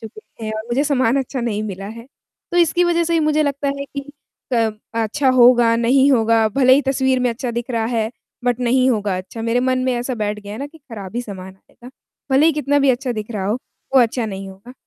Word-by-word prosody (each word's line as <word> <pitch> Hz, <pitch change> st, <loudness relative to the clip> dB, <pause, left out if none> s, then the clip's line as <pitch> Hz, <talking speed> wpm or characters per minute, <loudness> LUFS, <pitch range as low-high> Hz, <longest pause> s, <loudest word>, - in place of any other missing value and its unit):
चुके 230 Hz, -, -11 dB
हैं 215 Hz, -, -3 dB
और 215 Hz, -, -4 dB
मुझे 245 Hz, +5 st, 0 dB
सामान 260 Hz, -3 st, +2 dB
अच्छा 265 Hz, -1 st, -3 dB
नहीं 215 Hz, -3 st, -2 dB
मिला 195 Hz, -2 st, -6 dB
है, 230 Hz, +2 st, -9 dB, 0.5 s
तो -, -, 0 dB
इसकी 345 Hz, +1 st, +3 dB
वज़ह 340 Hz, -1 st, +2 dB
से 335 Hz, -, -1 dB
ही 330 Hz, -, +3 dB
मुझे 305 Hz, 0 st, +2 dB
लगता 285 Hz, -1 st, -1 dB
है 280 Hz, -, -4 dB
कि 280 Hz, 0 st, -6 dB, 0.5 s
क 225 Hz, -2 st, +2 dB, 0.2 s
अच्छा 230 Hz, +5 st, 0 dB
होगा, 240 Hz, -2 st, +5 dB
नहीं 260 Hz, +4 st, +4 dB
होगा, 225 Hz, -2 st, +3 dB
भले 255 Hz, +3 st, +4 dB
ही 285 Hz, -, +3 dB
तस्वीर 265 Hz, -1 st, +1 dB
में 250 Hz, -, +2 dB
अच्छा 240 Hz, +2 st, -4 dB
दिख 235 Hz, +2 st, -4 dB
रहा 230 Hz, -2 st, 0 dB
है, 225 Hz, -2 st, -1 dB, 0.4 s
बट 245 Hz, 0 st, 0 dB
नहीं 255 Hz, +1 st, +3 dB
होगा 205 Hz, -4 st, 0 dB
अच्छा। 185 Hz, +5 st, -7 dB
मेरे 230 Hz, +2 st, +1 dB
मन 255 Hz, 0 st, +1 dB
में 255 Hz, -, +1 dB
ऐसा 245 Hz, +2 st, -2 dB
बैठ 210 Hz, -2 st, -2 dB
गया 205 Hz, 0 st, -9 dB
है 215 Hz, -, -7 dB
ना 280 Hz, -, -4 dB
कि 320 Hz, +2 st, -17 dB
खराब 225 Hz, -7 st, -9 dB
ही 245 Hz, -, -1 dB
सामान 190 Hz, -4 st, -9 dB
आएगा, 240 Hz, +5 st, -17 dB, 0.4 s
भले 280 Hz, +4 st, +5 dB
ही 325 Hz, -, +4 dB
कितना 285 Hz, -1 st, +1 dB
भी 275 Hz, -1 st, +4 dB
अच्छा 250 Hz, 0 st, -1 dB
दिख 215 Hz, 0 st, -6 dB
रहा 205 Hz, -4 st, -3 dB
हो, 210 Hz, -, +1 dB, 0.4 s
वो 265 Hz, -, +7 dB
अच्छा 235 Hz, 0 st, +1 dB
नहीं 195 Hz, -2 st, -6 dB
होगा। 195 Hz, +6 st, -13 dB
240 Hz, 240 wpm, -19 LUFS, 220-270 Hz, 0.5 s, वो